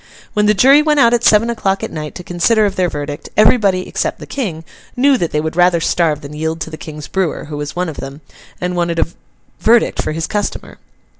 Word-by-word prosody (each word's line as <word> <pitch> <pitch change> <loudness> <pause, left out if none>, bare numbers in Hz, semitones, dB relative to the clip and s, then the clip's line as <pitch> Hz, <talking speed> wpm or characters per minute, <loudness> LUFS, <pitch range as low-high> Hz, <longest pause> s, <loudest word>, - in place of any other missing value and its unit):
When 210 0 +2
the 210 - +4
jury 275 +7 +6
went 300 -1 +2
out 235 -2 +5
at 240 -1 +1
seven 215 +2 +5
o'clock 195 -4 -1
at - - -4
night 150 -1 -6
to 180 - -8
consider 210 +6 +2
of 200 -1 -1
their 180 -1 +1
verdict, 145 -1 -6
everybody 205 -4 +3
(except - - -2
the - - -10
King) 185 - -4 0.3
knew 275 +2 +4
that 170 -10 -1
they 150 - -1
would 160 +1 -3
rather 175 -1 +4
starve 160 -3 0
than 140 +1 -9
yield 160 +2 -3
to 160 - -5
the - - -6
King's 155 -2 -9
brewer, 190 -4 -2
who 150 0 -7
was 145 -1 -5
one 180 +1 -1
of 160 - -7
them, 135 +2 -8 0.4
and 180 0 -2
wanted 170 -1 -1
a - - +3 0.5
verdict 235 +1 +3
for - - -3
his 165 +1 -2
customer. 205 -1 -4
175 Hz, 230 wpm, -16 LUFS, 155-215 Hz, 0.5 s, jury